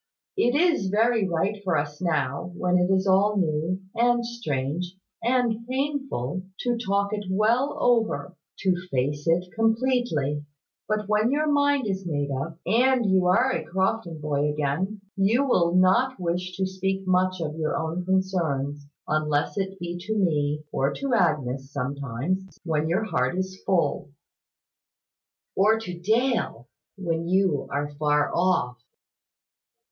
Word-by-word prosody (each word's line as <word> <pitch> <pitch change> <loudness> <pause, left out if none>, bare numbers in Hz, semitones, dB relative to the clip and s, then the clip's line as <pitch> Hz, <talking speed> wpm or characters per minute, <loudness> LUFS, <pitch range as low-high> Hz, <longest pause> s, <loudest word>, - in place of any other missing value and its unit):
It 245 -10 +2
is 320 - +3
very 220 0 +2
right 195 +5 -1
for 180 -5 +1
us 145 +2 -3
now, 150 -2 -1
when 180 0 +2
it 180 +1 +2
is 190 0 +2
all 200 +2 +3
new, 170 +1 0
and 240 0 +2
strange, 175 - -3 0.3
and 235 -2 +1
painful, 265 - -2 0.2
to 245 -1 0
talk 200 -3 0
it 205 -1 -3
well 225 +8 +2
over; 225 -6 +1 0.3
to 185 -2 +3
face 145 +3 -1
it 170 +2 +3
completely; 225 - +1 0.4
but 215 -1 -1
when 215 +2 +2
your 295 +3 +1
mind 285 -3 +2
is 190 -2 -3
made 145 -3 -1
up, 140 +5 -4
and 250 +1 +3
you 185 -1 +3
are 245 +9 +4
a - - -2
Crofton 190 -3 -1
boy 150 -1 0
again, 155 +8 -2
you 225 +8 +2
will 175 -7 +3
not 215 +7 +3
wish 180 +1 -2
to 190 - +1
speak 190 +1 -2
much 185 0 +2
of 155 -2 -3
your 155 -1 -1
own 165 +3 -2
concerns, 160 -7 -1 0.2
unless 150 -1 0
it 195 -1 -3
be 175 -1 -5
to 220 - 0
me, 150 -6 +1
or 135 +1 +1
to 275 -2 -2
Agnes, 140 - 0
sometimes, 140 +7 -3 0.2
when 160 -2 0
your 175 +6 +1
heart 195 -4 0
is 190 0 -4
full." 175 -4 +1 1.5
"Or 215 +3 +4
to 185 -5 -6
Dale, 220 - 0 0.3
when 170 -3 -2
you 185 -6 +2
are 145 +1 -2
far 150 -1 +2
off." 170 -10 +1
185 Hz, 145 wpm, -25 LUFS, 155-220 Hz, 1.5 s, are